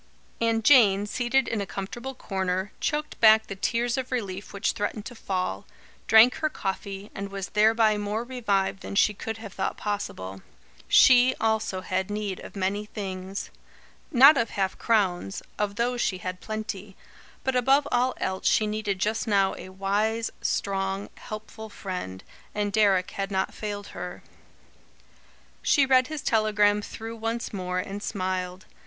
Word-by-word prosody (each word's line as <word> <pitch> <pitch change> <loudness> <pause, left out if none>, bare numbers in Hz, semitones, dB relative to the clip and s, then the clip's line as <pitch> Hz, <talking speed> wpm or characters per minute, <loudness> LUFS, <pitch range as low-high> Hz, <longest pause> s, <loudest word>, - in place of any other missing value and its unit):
And 225 -1 +1
Jane, 205 -8 +6
seated 245 +4 +1
in 220 - -1
a 200 - -4
comfortable 240 +8 -6
corner, 190 -3 -2
choked 300 0 -2
back 220 -1 +7
the 195 - -6
tears 235 +5 0
of 260 0 -5
relief 200 -6 -4
which 200 +2 0
threatened 210 -1 -3
to 245 - -7
fall, 185 - -3 0.4
drank 220 +3 +7
her 310 - 0
coffee, 195 -4 -5
and 200 0 -5
was 195 -1 -5
thereby 220 0 +4
more 205 +2 -2
revived 205 -7 -1
than - - -6
she 210 +1 +4
could 225 +2 -5
have 220 -3 -9
thought 190 - -2
possible. 95 - -4 0.5
She, 255 0 +6
also, 220 -4 0
had 185 +1 -2
need 205 -2 -3
of - - -11
many 200 +2 -1
things. 190 -2 -5 0.6
Not 275 +4 +8
of 230 -2 +1
half 190 -2 -1
crowns; 185 - 0 0.2
of 205 -1 -1
those 240 +2 0
she 185 - 0
had 185 0 -6
plenty. 210 -3 -5 0.5
But 265 -1 0
above 270 +3 +3
all 250 +1 +2
else 190 0 -2
she 215 - +4
needed 210 -2 -2
just 215 +5 -1
now 195 -2 +3
a - - -9
wise, 205 +4 -1
strong, 195 0 -1
helpful 220 +1 -8
friend, 180 - -6 0.3
and 205 -1 -1
Deryck 195 -4 +3
had 195 0 -3
not 190 -1 -1
failed 205 -1 -5
her. - - -7 1.4
She 280 - +4
read 260 -1 +4
his 310 -2 -5
telegram 210 -2 +3
through 225 +2 -7
once 225 +1 -3
more, 180 -2 -3
and 195 +2 -4
smiled. 185 -2 -3
205 Hz, 155 wpm, -26 LUFS, 195-225 Hz, 1.4 s, Not